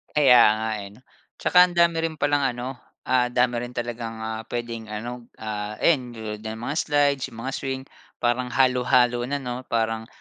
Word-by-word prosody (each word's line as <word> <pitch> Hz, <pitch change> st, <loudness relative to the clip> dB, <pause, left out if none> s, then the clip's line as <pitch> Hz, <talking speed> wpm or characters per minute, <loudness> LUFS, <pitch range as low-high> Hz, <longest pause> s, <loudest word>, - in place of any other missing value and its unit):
Kaya 135 Hz, -5 st, +7 dB, 0.2 s
nga, 110 Hz, +1 st, -2 dB
eh, 100 Hz, -1 st, -7 dB
'no? 125 Hz, -, -20 dB, 0.4 s
Tsaka 180 Hz, 0 st, +6 dB
ang 175 Hz, -, -9 dB
dami 170 Hz, -1 st, +3 dB
rin 160 Hz, -, -6 dB
palang 145 Hz, -1 st, +1 dB, 0.2 s
ano, 125 Hz, +2 st, -6 dB, 0.2 s
ah, 125 Hz, -1 st, +2 dB
dami 125 Hz, 0 st, +1 dB
rin 120 Hz, +1 st, -6 dB
talagang, 120 Hz, -1 st, -4 dB
ah, 110 Hz, 0 st, -5 dB
puwedeng 115 Hz, -2 st, -5 dB
ano, 115 Hz, +3 st, -6 dB, 0.2 s
ah, 105 Hz, -1 st, -4 dB
ayan 130 Hz, -7 st, +2 dB
tulad 110 Hz, -2 st, -6 dB
nga 110 Hz, +1 st, -6 dB
ng 110 Hz, -, -9 dB
mga 145 Hz, -, -3 dB
slides, 145 Hz, -3 st, +2 dB
yung -, -, -11 dB
mga 135 Hz, +2 st, -3 dB
swing 130 Hz, 0 st, -4 dB, 0.4 s
parang 120 Hz, +1 st, +1 dB
halo-halo 125 Hz, -1 st, +3 dB
na, 140 Hz, +1 st, -3 dB
'no, 125 Hz, 0 st, -5 dB
parang, 110 Hz, -1 st, -1 dB
120 Hz, 190 wpm, -24 LUFS, 115-130 Hz, 0.4 s, Kaya